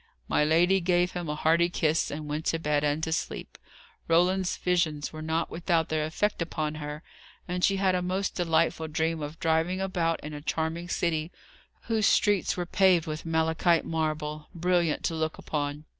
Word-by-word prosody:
My - - +2
lady 175 +5 +4
gave 175 0 +2
him 175 -3 -4
a 150 - -1
hearty 165 +3 +3
kiss, 160 -2 +1
and 150 +1 -5
went 150 +2 -3
to 165 - +1
bed 150 -2 0
and 150 +2 0
to 160 - -1
sleep. 160 - -3 0.5
Roland's 180 +2 +2
visions 165 -5 0
were 155 - -7
not 160 +1 -1
without 165 -1 0
their 155 -1 0
effect 205 +5 -1
upon 155 -2 -2
her, 150 +1 -6 0.4
and 180 0 -3
she 195 - +3
had 190 -1 +2
a 180 - +1
most 185 +2 -1
delightful 165 -2 +1
dream 160 +1 -1
of 150 +2 -6
driving 165 +3 +1
about 175 -4 0
in 150 +1 -7
a 145 - -6
charming 160 +3 -2
city, 165 -2 -1 0.5
whose 220 -3 +1
streets 205 -4 +2
were 175 - -1
paved 180 -2 +3
with 155 0 -5
malachite 160 +1 +2
marble, 155 -1 -2
brilliant 175 -2 +1
to - - 0
look 160 0 -2
upon. 145 0 -3
165 Hz, 180 wpm, -28 LUFS, 155-180 Hz, 0.5 s, lady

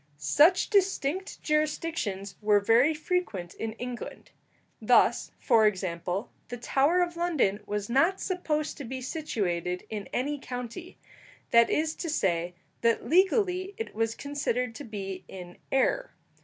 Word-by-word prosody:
Such 300 - +4
distinct 385 -3 0
jurisdictions 305 - -1
were 210 -1 +4
very 230 +8 +4
frequent 300 - -2
in 225 -1 -4
England. 245 +1 -7 0.5
Thus, - - +3
for 220 -1 +4
example, 185 0 -2 0.2
the 245 - -6
Tower 280 +9 +2
of 345 -1 -4
London 315 - +1
was 205 -1 -2
not 330 +10 +2
supposed 310 -5 -2
to 285 - -6
be 260 +1 -5
situated 185 - -2
in 210 -2 -4
any 285 +4 -1
county; 250 +8 -7 0.5
that 235 0 +6
is 310 +1 +1
to 335 - -4
say, 175 - 0 0.3
that 230 -1 +1
legally 375 +1 +2
it 450 - -5
was 225 +1 -1
considered 250 -4 -2
to 290 - -8
be 195 -5 -6
in 180 -2 -10
air. - - +1
250 Hz, 135 wpm, -28 LUFS, 205-330 Hz, 0.5 s, that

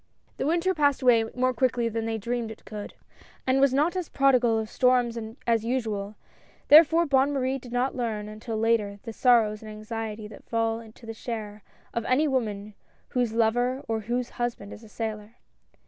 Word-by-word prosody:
The - - -1
winter 345 +4 +2
passed 285 -5 +1
away 235 -3 +5
more 255 0 +1
quickly 250 -1 +1
than 225 0 -2
they 225 0 -1
dreamed 235 +1 -3
it 220 - -11
could, 210 -1 -8 0.5
and 265 +1 +2
was 275 -1 +5
not 300 +7 +1
as 365 -3 -3
prodigal 255 -4 +3
of 220 0 -2
storms 250 0 +2 0.3
as 230 -2 +2
usual, 220 -4 -2 0.5
therefore 325 +3 +7
Bonne 275 -1 +3
Marie 270 -1 -1
did 245 -1 -12
not 245 +2 0
learn, 220 -4 -3
until 215 +1 -6
later, 215 -2 +1
the 225 - -7
sorrows 220 -4 +3
and 220 - -9
anxiety 215 0 -6
that 210 - -14
fall 225 -1 -1
to 230 - -16
the 225 - -6
share 215 -2 -6 0.3
of 235 - -1
any 280 +5 +2
woman 215 -6 -2 0.4
whose 245 -3 0
lover 245 +4 +1
or 225 -1 -1
whose 240 +3 -3
husband 235 -4 -3
is 220 - -12
a 220 - -14
sailor. 215 0 -5
230 Hz, 180 wpm, -26 LUFS, 220-255 Hz, 0.5 s, therefore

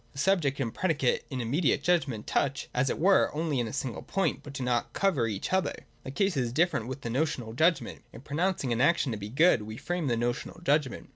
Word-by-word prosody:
The - - -15
subject 145 -4 +1
and 115 -5 -2
predicate 155 -8 0
in 130 - -4
the 120 - -2
immediate 145 +4 +1
judgment 145 -11 +1
touch, 140 0 -1
as 130 +1 +1
it - - -1
were, 190 +4 +4
only 155 -4 0
in 120 - -1
a - - -6
single 120 -2 -4
point, 195 0 -1
but 145 - -10
do 135 -1 -4
not 120 -1 -1
cover 165 -13 +1
each 105 - -4
other. 190 0 -1 0.2
The - - -7
case 195 +6 0
is 125 -4 0
different 155 -5 +1
with 130 +2 -6
the 115 - -4
notional 125 -4 -1
judgment. 160 +3 +1
In 115 - -11
pronouncing 150 -2 -1
an 115 - 0
action 145 -2 +3
to 110 - -3
be 100 +1 -6
good, 150 +1 +4
we 110 +1 -7
frame 175 -2 -2
a 120 - +1
notional 120 +2 -3
judgment. 145 -6 0
140 Hz, 230 wpm, -28 LUFS, 120-165 Hz, 0.2 s, were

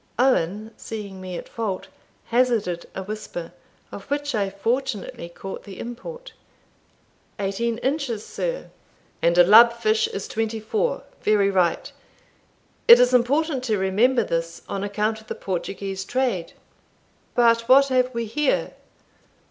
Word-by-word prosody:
Owen, 215 -4 +1
seeing 200 -4 -7
me 185 -1 -6
at - - -8
fault, 210 -5 -4 0.4
hazarded 230 -8 +1
a 190 - -4
whisper, 200 -4 -6 0.4
of 200 - -9
which 285 0 -2
I 200 -3 0
fortunately 225 -3 -3
caught 190 +3 -8
the 195 -2 -10
import. 480 - -8 1.0
"Eighteen 215 +4 -1
inches, 260 -4 -2
sir." - - -4 0.5
"And 170 +1 +2
a 175 - +9
lub 225 +6 +8
fish 220 -1 +1
is 195 - -5
twenty 225 0 -2
four 430 - -1 0.2
very 205 -2 +3
right. 180 -3 +1 1.0
It 235 - +10
is 250 0 +4
important 270 +3 +2
to 220 -4 +1
remember 220 +6 +2
this, 165 -2 -3
on 195 0 -3
account 210 +2 -1
of 220 - -21
the - - -4
Portuguese 195 +1 -4
trade 230 -7 -1 0.8
But 230 -1 +3
what 275 +1 +7
have 255 -1 +2
we 235 -1 -3
here? 285 +6 0
220 Hz, 135 wpm, -23 LUFS, 195-250 Hz, 1.0 s, It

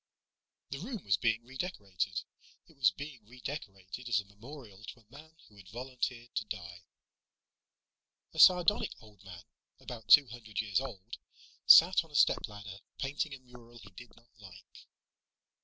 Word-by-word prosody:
The 135 - -4
room 220 0 -6
was 95 -3 +2
being 115 -1 0
redecorated. 105 - -4 0.4
It 160 - -22
was 130 -7 +4
being 135 +3 -9
redecorated 120 -3 -8
as 115 - +3
a 100 - -7
memorial 105 0 -13
to 115 +2 -10
a 110 - -32
man 155 +4 -14
who 105 - -21
had 95 -2 -15
volunteered 120 0 -5
to - - -2
die. 85 -3 -8 1.5
A 160 - -7
sardonic 180 +4 +5
old 105 -4 -18
man, 90 -2 -11 0.4
about 115 -4 -9
two 145 - +9
hundred 110 -3 -7
years 110 +2 0
old, 115 -5 -8 0.5
sat 175 +1 +8
on 165 - -19
a 145 - -13
stepladder, 100 -7 0 0.2
painting 145 +1 -3
a - - -14
mural 120 -2 -16
he 100 -3 -14
did 120 +5 -14
not 115 +1 -23
like. 95 -2 -15
115 Hz, 155 wpm, -32 LUFS, 100-135 Hz, 1.5 s, two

